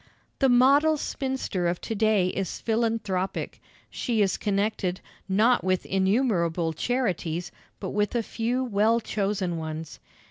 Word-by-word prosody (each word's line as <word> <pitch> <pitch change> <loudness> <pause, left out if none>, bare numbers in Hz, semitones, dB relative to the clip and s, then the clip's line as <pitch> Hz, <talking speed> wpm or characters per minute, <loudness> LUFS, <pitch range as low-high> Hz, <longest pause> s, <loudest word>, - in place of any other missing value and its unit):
The 270 - +4
model 280 +5 +5
spinster 260 -11 -2
of 175 0 -1
to - - -4
day 215 -4 +2
is 190 -1 -3
philanthropic. 220 -5 -1 0.3
She 225 -4 0
is 190 -2 +1
connected, 200 -3 -1 0.3
not 225 +6 +3
with 185 0 0
innumerable 190 -5 +1
charities, 180 - -1 0.3
but 190 - -4
with 210 +3 0
a 235 - +1
few 240 +4 -1
well 225 0 +2
chosen 195 -5 -2
ones. 160 0 -6
205 Hz, 130 wpm, -26 LUFS, 185-235 Hz, 0.3 s, model